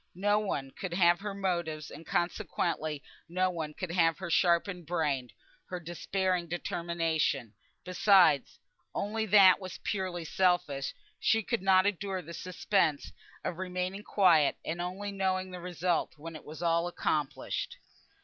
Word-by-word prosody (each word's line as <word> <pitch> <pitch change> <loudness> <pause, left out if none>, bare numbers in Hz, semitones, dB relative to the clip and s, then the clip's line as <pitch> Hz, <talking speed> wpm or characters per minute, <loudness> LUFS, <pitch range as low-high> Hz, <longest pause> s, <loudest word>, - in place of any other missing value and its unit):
No 205 +2 +3
one 140 -10 -3
could 180 +2 -5
have 175 -1 +4
her 205 0 -5
motives; 170 -6 -2
and 165 - -11
consequently 155 -3 -1 0.3
no 185 +1 +1
one 155 -3 -5
could 185 -3 -4
have 165 -3 +3
her 185 -2 -5
sharpened 175 0 +2
brain, 145 -7 -1 0.4
her 180 - -4
despairing 175 +1 -1
determination. 165 -8 -1 0.3
Besides 180 -5 +4 0.4
(only 220 +2 -1
that 195 -2 +7
was 185 -3 -7
purely 185 -4 -2
selfish), 175 -6 +1 0.2
she 225 0 +2
could 235 +1 -1
not 190 0 +5
endure 195 -2 -1
the 170 +2 -9
suspense 180 -3 0 0.3
of 175 - -3
remaining 185 +1 -3
quiet, 170 -9 +4
and 170 +2 -3
only 190 +3 -4
knowing 185 -1 -1
the 180 - -7
result 175 -2 -1
when 165 +2 -8
all 155 - -10
was 155 +3 -8 0.3
accomplished. 150 -5 -2
180 Hz, 140 wpm, -30 LUFS, 165-190 Hz, 0.4 s, that